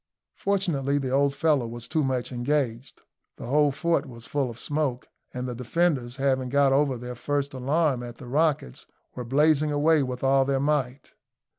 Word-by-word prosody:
Fortunately 165 -9 0
the 135 -2 -2
old 140 +1 +2
fellow 145 -4 +2
was 115 0 -8
too 155 -1 0
much 130 -2 -1
engaged. 125 -1 -2 0.3
The - - -9
whole 145 +3 +3
fort 160 0 0
was 115 -2 -11
full 140 -3 -1
of 115 - -9
smoke, 145 -2 -2 0.2
and 125 0 -4
the 125 - -4
defenders, 125 0 0
having 130 -2 0
got 140 0 +3
over 135 -2 +2
their 125 +1 -6
first 140 +3 -2
alarm 135 +1 0
at 120 -1 -8
the - - -11
rockets, 145 - -1 0.3
were 125 - -5
blazing 150 +4 +2
away 150 +1 +3
with 125 -1 -4
all 135 0 +4
their 135 0 0
might. 140 -2 -1
135 Hz, 175 wpm, -26 LUFS, 125-150 Hz, 0.3 s, all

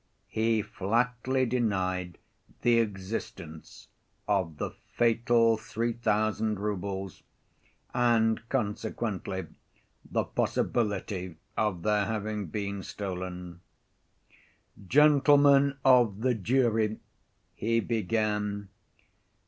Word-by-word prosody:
He 110 -1 +1
flatly 125 +6 0
denied 95 -7 -1 0.5
the 120 -1 +5
existence 95 -6 -5 0.4
of 95 -7 0
the - - -3 0.2
fatal 115 -1 +3
three 115 +2 -2
thousand 110 -1 0
roubles, 95 -2 -4 0.7
and 115 -2 +3
consequently, 105 -5 -2 0.6
the - - -1
possibility 100 -5 -1 0.2
of 95 -6 -1
their 105 -1 +2
having 105 -2 -3
been 100 +2 -4
stolen. 90 -3 -6 1.3
"Gentlemen 140 0 +5
of 120 -6 +5
the 130 +1 +2
jury," 110 -1 +1 0.6
he 115 +2 0
began. 105 -2 -1
110 Hz, 80 wpm, -29 LUFS, 100-120 Hz, 1.3 s, the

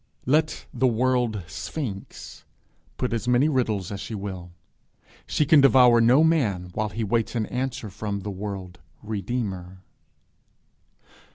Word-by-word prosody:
Let 155 +4 +1
the 130 +1 +2
world 120 -3 +1
sphinx 95 - -7 0.5
put 125 -2 -1
as 115 +1 -2
many 125 +4 +4
riddles 110 - 0
as 100 - -5
she 110 - -6
will, 95 -3 -6 0.8
she 150 - +1
can 145 0 +6
devour 125 -3 +6
no 125 +7 +5
man 105 - +1
while 105 +2 -1
he 110 +3 -4
waits 115 +2 0
an 110 -2 0
answer 125 -3 -4
from 100 0 -4
the 105 - -5
world 95 -3 -6 0.2
redeemer. 100 -4 -4
110 Hz, 130 wpm, -25 LUFS, 100-125 Hz, 0.8 s, can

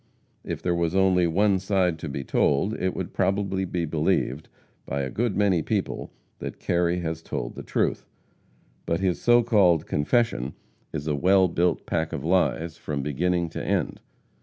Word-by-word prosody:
If - - -5
there 90 - +1
was 85 0 0
only 95 -2 +4
one 95 +3 +2
side 95 -4 +1
to 80 - -5
be 70 0 -4
told, 70 - +1
it 95 0 0
would - - -5
probably 95 -1 0
be 90 -2 -2
believed 80 -2 0 0.3
by 70 +1 -3
a 65 - -4
good 115 -2 -1
many 100 -5 +3
people - - -2 0.3
that - - -6
Kerry 90 0 0
has 80 -1 -3
told - - -4
the - - -7
truth. - - -1 0.8
But 85 - +1
his 95 -2 0
so 120 0 +5
called 95 -8 +4
confession 75 - 0 0.4
is 75 -2 -4
a 75 - 0
well 95 +5 +4
built 85 0 0
pack 80 -1 -1
of 70 - -4
lies 85 -2 +1
from 70 -3 -4
beginning 85 +4 0
to - - -5
end. - - -1
85 Hz, 170 wpm, -25 LUFS, 80-95 Hz, 0.8 s, so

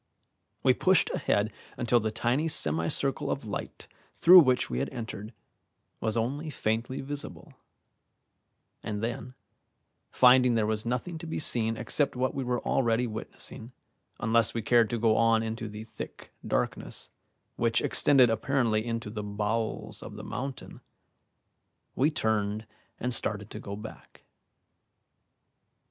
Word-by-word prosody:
We - - +5
pushed - - +3
ahead 105 +2 0 0.2
until 120 -1 +3
the 110 -1 -1
tiny 120 +8 0
semi 80 - +1
circle - - 0
of - - -2
light - - -6 0.3
through 180 +2 +9
which 130 -6 +3
we 60 -1 -3
had - - -1
entered 110 -3 -7 0.7
was 110 0 -1
only 140 +8 -2
faintly 115 0 -2
visible; 135 - -7 1.3
and 105 -1 -4
then, 120 +2 -4 0.7
finding 125 -1 +5
there 110 -2 +2
was 110 +1 -2
nothing 125 +8 -2
to 165 - -8
be 160 - -3
seen 115 -6 +1
except 145 +5 +1
what 130 +1 0
we 135 - -2
were 125 -1 -1
already 120 -1 +2
witnessing, 115 +2 -7 0.5
unless 115 0 +2
we 115 - -2
cared 115 -1 +4
to 120 - -1
go 110 -1 +3
on 115 -1 +4
into 110 -1 -4
the 105 +1 -7
thick 110 - -9 0.2
darkness, - - -2 0.4
which 115 0 +2
extended 130 -5 +4
apparently 115 -2 +1
into 115 -2 -4
the 105 -1 -4
bowels 105 +2 -3
of - - -9
the - - -8
mountain, 135 0 -6 1.1
we 140 +4 +3
turned 110 -6 -1 0.3
and 125 +1 0
started 105 -2 -1
to - - -6
go 100 - -6
back. 105 +2 -11
115 Hz, 140 wpm, -28 LUFS, 110-125 Hz, 1.3 s, through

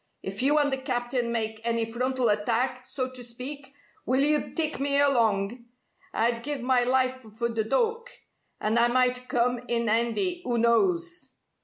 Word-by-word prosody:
If - - -4
you 285 +3 +3
and 290 -2 +2
the 265 - -1
Captain 245 -2 -2
make 220 -1 -2
any 230 -1 0
frontal 250 +1 -1
attack, 240 +5 0
so 255 -2 -3
to 255 -1 -10
speak, 265 +4 -3 0.3
will 260 +2 +2
you 295 +1 +2
tike 315 -3 0
me 280 0 +3
along? 235 -5 +2 0.5
I'd 235 +1 0
give 285 -1 -3
my 250 -1 +3
life 255 +1 +1
for 225 +1 -4
th' 220 -1 -2
Dook. 465 0 0 0.5
And 220 +2 +1
I 235 - +5
might 250 0 +1
come 245 0 +1
in 235 -1 0
'andy, 235 - 0
'oo 240 -1 0
knows?" 345 +10 +1
250 Hz, 165 wpm, -27 LUFS, 235-275 Hz, 0.5 s, I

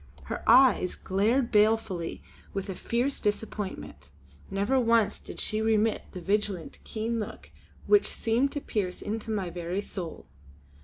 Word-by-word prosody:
Her - - -5
eyes 245 -6 +6
glared 225 +7 +1
balefully 210 -5 +2 0.3
with 195 0 -3
a - - -2
fierce 240 +8 0
disappointment; 205 - -3 0.4
never 200 +7 +1
once 230 -3 +3
did - - -9
she 215 0 -1
remit 220 0 +2
the 180 - -7
vigilant, 200 -2 -1
keen 230 +1 -2
look 210 - -7 0.3
which 415 -1 +5
seemed 240 +5 +1
to 290 - -3
pierce 190 -8 -2
into 220 +1 -4
my 195 -5 -1
very 175 +3 -3
soul. 175 -6 -6
215 Hz, 140 wpm, -28 LUFS, 195-230 Hz, 0.4 s, eyes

